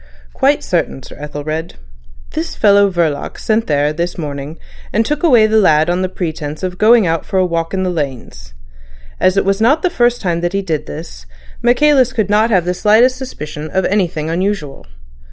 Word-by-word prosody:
"Quite - - +1
certain, 65 0 -2
Sir - - -12
Ethelred. 150 +2 -5 0.6
This 165 - -4
fellow 200 -1 +4
Verloc 165 -6 -2
went 220 +1 +1
there 145 0 +1
this 170 +2 -3
morning, 145 -1 -6 0.3
and 220 +2 +1
took 300 +4 -2
away 250 -11 +5
the 220 0 +3
lad 160 -4 +3
on 180 +1 -1
the 185 - -1
pretence 160 -3 -5
of 180 -1 -4
going 225 0 +5
out 165 -1 -1
for 190 - -3
a 185 - +3
walk 165 -1 -2
in 190 -1 -1
the 185 - -1
lanes. 125 - -6 0.6
As 185 +1 +2
it 195 - +2
was 195 +2 0
not 280 +8 +3
the 365 - +1
first 240 -5 +1
time 170 -3 -2
that 175 +1 -2
he 195 0 -1
did 160 -5 -3
this, - - -9 0.3
Michaelis 255 +1 +3
could 215 -5 -1
not 215 +2 +3
have 185 -6 +2
the 180 - 0
slightest 225 +7 +3
suspicion 155 - -7
of 190 +1 0
anything 175 -6 -1
unusual. 170 - -3
180 Hz, 190 wpm, -16 LUFS, 155-215 Hz, 0.6 s, away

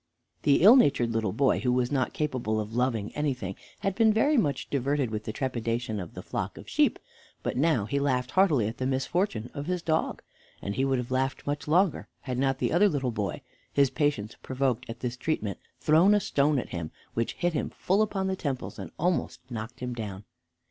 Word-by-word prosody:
The 140 +3 +4
ill 220 +6 +10
natured 125 - +3
little 110 -3 0
boy, 135 +6 +2
who 125 - +1
was 125 0 +1
not 130 -3 +1
capable 130 -8 -1
of 105 +1 -4
loving 120 -4 0
anything, 125 -10 -2 0.3
had 195 -1 0
been 220 +2 +4
very 285 +8 +3
much 145 - +1
diverted 140 -2 0
with 110 0 -4
the - - -2
trepidation 120 -3 -2
of 90 -3 -8
the - - -7
flock - - -4
of - - -11
sheep, - - +2 0.5
but - - -2
now 140 -6 +2
he 140 +6 -1
laughed 130 -3 0
heartily 160 - +3
at 115 - -6
the 130 - 0
misfortune 135 - -1
of 145 0 -5
his 180 -1 -1
dog, 160 -1 0 0.4
and 100 - -4
he 130 - 0
would 135 -1 +2
have 125 0 -4
laughed 130 +1 -1
much 145 +1 -3
longer 175 +3 +2
had 125 -2 -3
not 135 0 +1
the - - 0
other 200 +5 +5
little 135 -6 -1
boy, 105 -5 -3 0.3
his 140 -2 +3
patience 145 -8 0
provoked 130 -3 -1
at 115 +1 -7
this 125 -1 -2
treatment, 110 - -2 0.2
thrown 170 +7 +5
a - - +4
stone 145 -5 +2
at 125 - -3
him, 85 -3 -4 0.2
which 115 0 -1
hit 175 -1 -1
him 150 - -1
full 195 +3 +1
upon 200 -3 0
the 190 0 0
temples 140 -8 -4
and - - -6
almost 175 +2 0
knocked 120 +2 -6
him 125 -1 -3
down. 105 -4 -6
130 Hz, 210 wpm, -28 LUFS, 115-155 Hz, 0.5 s, ill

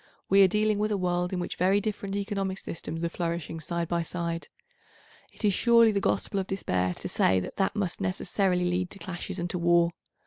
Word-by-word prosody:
We 195 +1 +6
are 195 - +8
dealing 210 +2 +1
with 215 +1 0
a 205 - +1
world 180 -1 0
in 185 - -2
which 175 - -4
very 190 +3 +3
different 205 -1 -3
economic 195 -2 -2
systems 165 -2 -5
are 170 - 0
flourishing 170 -1 -3
side 170 +1 -2
by 170 0 0
side. 170 0 -3 0.8
It 215 - -1
surely 230 +2 +5
is - - 0
the 200 - +1
gospel 200 - 0
of 190 - -3
despair 90 - -1
to - - -6
say 95 - +3
that 90 - -7
that 195 +1 +1
must 195 -5 -2
necessarily 185 -1 0
lead 180 0 0
to - - -10
clashes 185 0 -5
and 175 -1 -2
to 180 - -2
war. 170 0 +4
180 Hz, 210 wpm, -28 LUFS, 170-200 Hz, 0.8 s, are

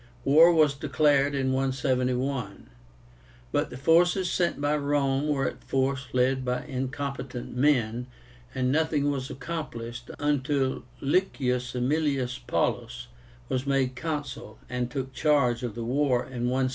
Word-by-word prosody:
War 160 +5 +7
was 155 -4 +4
declared 140 0 +2
in 130 -1 0
171; 130 - -1 0.8
but - - 0
the - - -8
forces 175 +5 +3
sent 175 -4 0
by 145 +1 +1
Rome 140 -1 +1
were 140 -2 +1
at - - -6
first 135 -1 -1
led 130 +1 +2
by 125 0 -2
incompetent 135 -2 -4
men, 125 -3 +1 0.5
and 130 -1 +1
nothing 150 -1 +1
was 135 -1 -3
accomplished 125 -6 -6
until 140 -3 0 0.2
LICIUS 130 -6 0
AEMILIUS 130 -1 0
PAULLUS 120 0 -1 0.4
was 130 +1 -2
made 135 -2 +1
Consul, 145 -1 -5
and 125 -1 -2
took 130 0 -4
charge 135 -6 +2
of 120 -4 -4
the 120 - -4
war 130 0 +1
in 125 -2 -4
168. 130 0 +1
135 Hz, 135 wpm, -27 LUFS, 125-145 Hz, 0.8 s, War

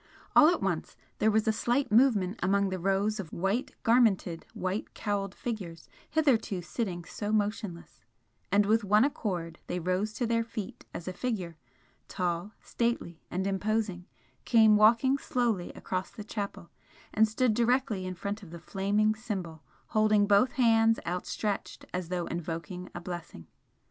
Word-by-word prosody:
All 310 - +8
at 345 - 0
once 175 -5 -2 0.2
there 215 - +4
was 220 +1 +2
a - - +5
slight 240 +3 0
movement 215 -4 +3
among 195 +2 +2
the 185 0 -3
rows 195 +4 +1
of 175 -6 -6
white 195 +8 -1
garmented, 220 -8 +2
white 185 +3 -3
cowled 200 -3 -2
figures 185 -9 -5 0.2
hitherto 250 - +1
sitting 175 -1 -3
so 205 +4 -4
motionless, 205 - -2 0.5
and 205 +1 +4
with 220 +2 +3
one 210 +2 +4
accord 175 - -3
they 180 - -2
rose 185 +5 -1
to 240 - -1
their 230 0 +1
feet 225 -3 -7
as 170 - -7
a 185 - -3
figure, 185 -7 -3 0.5
tall, 180 +2 -2
stately 235 -8 -2
and 185 +2 -2
imposing, 200 -2 -1 0.4
came 220 -3 +6
walking 230 +6 +5
slowly 235 -10 -1
across 185 0 -4
the 210 - -9
chapel 200 -4 -5 0.4
and 220 +1 +5
stood 225 +2 +1
directly 235 -4 +1
in 185 - -4
front 200 +5 -4
of 190 - -11
the 170 - -8
flaming 205 +4 +1
Symbol, 190 -8 -5 0.3
holding 215 -1 +4
both 205 +5 +4
hands 225 -4 +4
outstretched 190 +3 -3
as 180 -2 -3
though 180 -1 -1
invoking 170 +2 -5
a - - -3
blessing. 175 - -7
205 Hz, 155 wpm, -29 LUFS, 180-225 Hz, 0.5 s, All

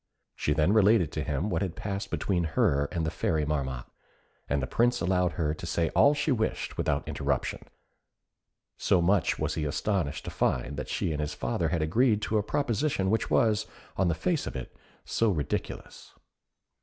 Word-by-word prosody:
She 75 - 0
then 80 +6 +3
related 105 -6 +4
to 80 - -3
him 75 +7 -2
what 80 - 0
had 95 -4 -2
passed 100 -1 -4
between 90 -4 0
her 70 +1 +3
and 85 -2 -1
the 80 - -1
Fairy 75 -2 0
Marmotte, 65 -4 -2 0.6
and 70 - +1
the 65 - -1
Prince 120 - +2
allowed 90 -1 +1
her 75 -2 0
to 80 - -8
say 80 0 0
all 140 - +5
she 145 +1 0
wished 110 -4 -1
without - - -1
interruption, - - -2 1.1
so 95 - +3
much 90 0 +2
was - - -1
he 80 - -2
astonished 80 +1 -1
to - - -4
find 65 +3 0
that 75 - -5
she - - -1
and 75 -1 -2
his 75 - -3
father - - -1
had 80 - 0
agreed 110 +7 +3
to 110 - +1
a - - +2
proposition 120 -4 0
which 110 - 0
was, 110 -2 +2 0.3
on 95 - +2
the 85 - +1
face 160 - -1
of - - -5
it, 65 - -6 0.3
so 115 - +1
ridiculous. 75 -7 -4
85 Hz, 185 wpm, -28 LUFS, 75-105 Hz, 1.1 s, all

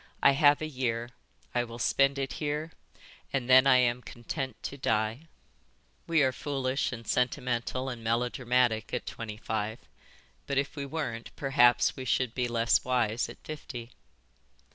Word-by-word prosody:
'I 140 - +8
have 145 +1 +4
a - - -1
year. 120 -4 -2 0.4
I 120 - +2
will 115 -1 -8
spend 135 +3 +2
it 135 -1 -2
here 150 +2 -2 0.6
and 130 -3 -1
then 130 +1 +7
I 135 - +7
am 125 -1 +2
content 125 +2 -5
to - - -4
die.'" 115 +3 -1 0.8
"We 165 -3 +4
are 130 - +3
foolish 135 0 -2
and 115 -2 -7
sentimental 125 +1 -1
and 120 -3 -5
melodramatic 120 0 +1
at - - -4
twenty 110 -2 -6
five, 110 0 -3 0.7
but 140 - -1
if 140 +2 0
we 140 -2 -4
weren't 125 -6 -4
perhaps 135 -3 +4
we 130 - -6
should 125 0 +1
be 125 -1 0
less 115 0 +2
wise 120 -2 0
at - - -10
fifty." 125 -6 -7
125 Hz, 155 wpm, -29 LUFS, 115-135 Hz, 0.8 s, I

